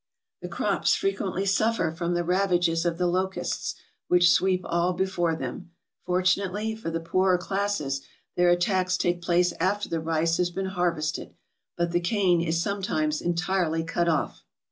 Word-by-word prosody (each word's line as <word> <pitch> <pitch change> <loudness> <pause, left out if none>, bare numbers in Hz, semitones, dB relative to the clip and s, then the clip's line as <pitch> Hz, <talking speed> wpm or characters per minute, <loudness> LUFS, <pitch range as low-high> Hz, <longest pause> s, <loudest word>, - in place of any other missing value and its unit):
The - - -5
crops - - +1
frequently 195 - -1
suffer 200 -3 +1
from 170 +1 -2
the 175 - 0
ravages 175 -2 +1
of 170 -1 -1
the 180 - 0
locusts, 185 +2 -1 0.3
which 175 0 +5
sweep 185 -1 +2
all 175 +1 +1
before 175 -3 0
them. 135 +5 -6 0.4
Fortunately 190 +4 +1
for 220 -6 -5
the 165 0 -2
poorer 185 +2 +2
classes, 180 -7 -2 0.3
their 175 0 +4
attacks 185 +1 +2
take 175 -1 0
place 175 0 +2
after 205 +2 0
the 165 - -1
rice 165 +1 0
has 180 -1 +1
been 190 +2 -4
harvested; 170 -3 -2 0.4
but 170 0 0
the 175 - +2
cane 180 -1 +2
is 165 0 0
sometimes 165 -5 -1
entirely 175 -1 0
cut 170 +1 0
off. 155 -3 -1
175 Hz, 155 wpm, -26 LUFS, 170-190 Hz, 0.4 s, which